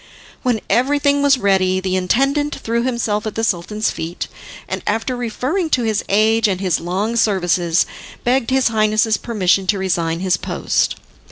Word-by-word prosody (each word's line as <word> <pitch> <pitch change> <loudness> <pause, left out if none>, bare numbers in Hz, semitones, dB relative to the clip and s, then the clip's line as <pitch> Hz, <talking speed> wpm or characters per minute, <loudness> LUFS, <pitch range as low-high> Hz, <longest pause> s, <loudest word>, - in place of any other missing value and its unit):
When 240 -4 0
everything 285 +2 +2
was 280 -1 +4
ready, 190 -3 +2
the 185 0 -2
intendant 275 +10 +1
threw 235 +1 -2
himself 230 -4 -1
at 215 - -5
the 225 - -2
Sultan's 210 +2 -1
feet, 165 +2 -5 0.4
and - - -4
after 225 +4 -1
referring 260 - -2
to 245 - -2
his 220 -2 0
age 220 +2 +3
and 190 -3 -1
his 185 -4 0
long 195 +7 -2
services, 180 -6 +2 0.4
begged 250 0 +1
his 260 -2 +2
Highness's 215 -1 +2
permission 195 -4 0
to 200 - +2
resign 170 -3 -1
his 185 -2 +1
post. - - -1
215 Hz, 160 wpm, -19 LUFS, 185-245 Hz, 0.4 s, was